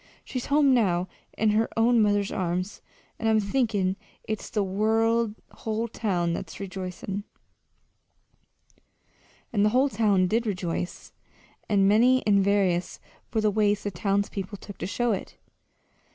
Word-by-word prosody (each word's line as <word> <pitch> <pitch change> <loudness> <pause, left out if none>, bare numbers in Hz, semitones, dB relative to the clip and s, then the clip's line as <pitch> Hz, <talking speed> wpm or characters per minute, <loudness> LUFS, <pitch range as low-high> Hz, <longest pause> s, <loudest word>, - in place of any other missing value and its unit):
She's 255 -2 -4
home 285 -1 +4
now, 185 -7 +2 0.3
in 220 -1 +3
her 220 +2 +2
own 230 +1 +4
mother's 205 -1 +2
arms, 180 +1 -2 0.4
and 225 - +1
I'm 220 0 +4
thinkin' 205 -4 0 0.3
it's 215 -1 -4
the 210 -3 0 0.9
whole 220 +1 -3
town 180 -7 -1
that's - - -6
rejoicin'!" 190 +1 -5 2.3
And 205 -2 +3
the 210 - +4
whole 260 +5 +3
town 205 -7 +2
did 225 +5 0
rejoice 180 -3 -4 0.6
and 195 -2 +4
many 245 +5 +4
and 200 -2 +4
various 190 -3 +1 0.3
were 220 - +1
the 215 -1 +2
ways 205 0 +1
the 205 - -2
townspeople 200 +1 -2
took 200 0 -11
to - - -3
show 240 +4 0
it. 200 - -4
205 Hz, 135 wpm, -26 LUFS, 190-225 Hz, 2.3 s, home